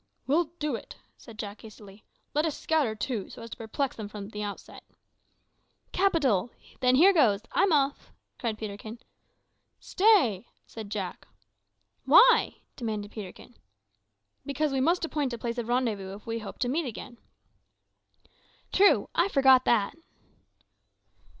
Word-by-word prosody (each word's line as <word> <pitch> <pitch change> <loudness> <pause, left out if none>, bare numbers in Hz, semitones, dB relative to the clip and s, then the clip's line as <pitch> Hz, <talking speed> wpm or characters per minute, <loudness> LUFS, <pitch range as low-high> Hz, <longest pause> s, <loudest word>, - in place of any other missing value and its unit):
"We'll 320 +6 +2
do 300 -2 -2
it!" - - -9 0.2
said 230 -3 -14
Jack 205 -1 -7
hastily. 210 -2 -14 0.3
"Let 300 +2 +1
us 310 - -4
scatter, 295 -9 0
too, 215 -2 -4
so - - -10
as 230 - -10
to - - -7
perplex 240 +4 -3
them 215 -2 -7
at 210 0 -8
the 210 - -6
outset." 205 -1 -7 1.1
"Capital! 285 - +2 0.3
Then 255 -1 +3
here 370 +8 +6
goes. 225 - +3
I'm 395 - +2
off," 285 -2 0 0.3
cried 225 -3 -2
Peterkin. 215 +1 -7 0.8
"Stay!" 355 - +3 0.2
said 220 -3 -9
Jack. 195 -4 -5 0.8
"Why?" - - +5
demanded 215 -3 -4
Peterkin. 210 +3 -10 0.9
"Because 285 +1 -1
we 270 -1 0
must 335 +5 +2
appoint 295 -5 -2
a - - -4
place 235 +1 -4
of 230 - -4
rendezvous 220 -6 -1
if 205 - -14
we 230 0 -3
would - - -6
hope 195 - -8
to 250 - +1
meet 295 +4 -1
again." 240 +1 -9 1.5
"True; 400 +1 +4
I 345 - +3
forgot 265 -6 +5
that." 215 -4 +2
240 Hz, 145 wpm, -28 LUFS, 215-295 Hz, 1.5 s, here